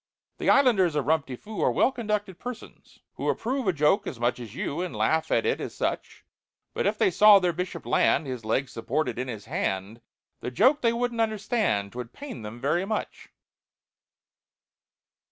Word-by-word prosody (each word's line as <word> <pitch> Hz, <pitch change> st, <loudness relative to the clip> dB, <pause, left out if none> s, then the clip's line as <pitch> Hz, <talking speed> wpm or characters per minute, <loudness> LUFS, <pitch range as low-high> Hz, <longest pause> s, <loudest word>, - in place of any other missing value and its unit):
"The -, -, 0 dB
islanders 205 Hz, -, +4 dB
of 145 Hz, -4 st, 0 dB
Rum 160 Hz, +2 st, +3 dB
ti 135 Hz, -2 st, -8 dB
Foo 215 Hz, -, -7 dB
Are -, -, +3 dB
well -, -, +3 dB
conducted 210 Hz, -6 st, -3 dB
persons, 245 Hz, -1 st, -9 dB, 0.2 s
who -, -, -1 dB
Approve 255 Hz, -1 st, -1 dB
a -, -, +5 dB
joke 150 Hz, +4 st, +2 dB
as 125 Hz, -, -6 dB
much 120 Hz, +1 st, 0 dB
as 115 Hz, -2 st, -9 dB
you, 150 Hz, +4 st, -3 dB
And 180 Hz, -, -4 dB
laugh 160 Hz, 0 st, +1 dB
at -, -, +2 dB
it 460 Hz, -, 0 dB
as -, -, -6 dB
such; -, -, -3 dB, 0.5 s
But -, -, 0 dB
if -, -, 0 dB
they 385 Hz, -, +3 dB
saw 210 Hz, -, +8 dB
their 180 Hz, -2 st, +1 dB
Bishop 180 Hz, +2 st, -5 dB
land, 150 Hz, -, +2 dB
His 125 Hz, -4 st, -5 dB
leg 115 Hz, +5 st, 0 dB
supported 125 Hz, +5 st, -2 dB
in 130 Hz, -, -3 dB
his 110 Hz, -5 st, -7 dB
hand, 95 Hz, +5 st, -3 dB, 0.4 s
The -, -, -4 dB
joke 265 Hz, -, +3 dB
they 230 Hz, -, +3 dB
wouldn't 235 Hz, 0 st, -1 dB
understand— 210 Hz, -, 0 dB
'Twould 125 Hz, -1 st, -7 dB
pain 280 Hz, -, -8 dB
them 110 Hz, +2 st, -8 dB
very 155 Hz, +7 st, +1 dB
much!" 215 Hz, +2 st, -4 dB
170 Hz, 185 wpm, -26 LUFS, -, 0.5 s, saw